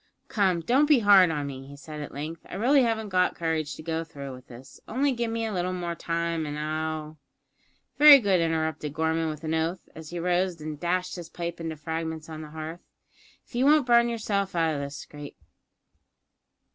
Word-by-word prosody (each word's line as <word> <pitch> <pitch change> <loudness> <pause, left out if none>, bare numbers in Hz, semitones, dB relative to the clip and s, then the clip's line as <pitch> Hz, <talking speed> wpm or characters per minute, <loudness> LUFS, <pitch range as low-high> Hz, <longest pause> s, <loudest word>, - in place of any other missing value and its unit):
"Come, 190 -5 +1
don't 265 - +3
be 295 -2 +6
hard 200 -4 +7
on 150 -3 -2
me," 135 -1 -7
he 140 0 -11
said 150 +1 -8
at 145 - -7
length; 155 +4 -6
"I - - -7
really 265 +7 +4
haven't 225 -3 0
got 185 -1 +2
courage 160 -3 -2
to - - -10
go 165 0 -2
through 140 -4 -8
with 130 0 -13
this. 125 +2 -13
Only 275 +5 +1
give 235 -2 -2
me 225 0 -2
a 220 - -3
little 180 0 -1
more 175 -2 -3
time, 170 -1 -2
and 145 0 -4
I'll 155 0 -3 0.4
" - - -41
"Very 295 -1 +11
good," 195 -8 +2
interrupted 160 -3 -1
Gorman, 160 0 0
with 155 0 -7
an 160 0 -2
oath, 165 +3 -2
as 160 -1 -10
he 175 - -6
rose 180 0 0
and 155 -1 -6
dashed 180 +2 -1
his 175 -2 -8
pipe 170 -1 -5
into 160 -1 -4
fragments 160 +1 -5
on 155 -1 -7
the 155 - -9
hearth; 160 +2 -7 0.6
"if - - -25
you 245 +2 +1
won't 300 -1 +5
burn 235 -1 +5
yourself 200 -5 -2
out 165 -2 +2
o' 145 - -3
this 140 +1 -5
scrape." 145 -1 -10
165 Hz, 210 wpm, -27 LUFS, 155-195 Hz, 0.6 s, Very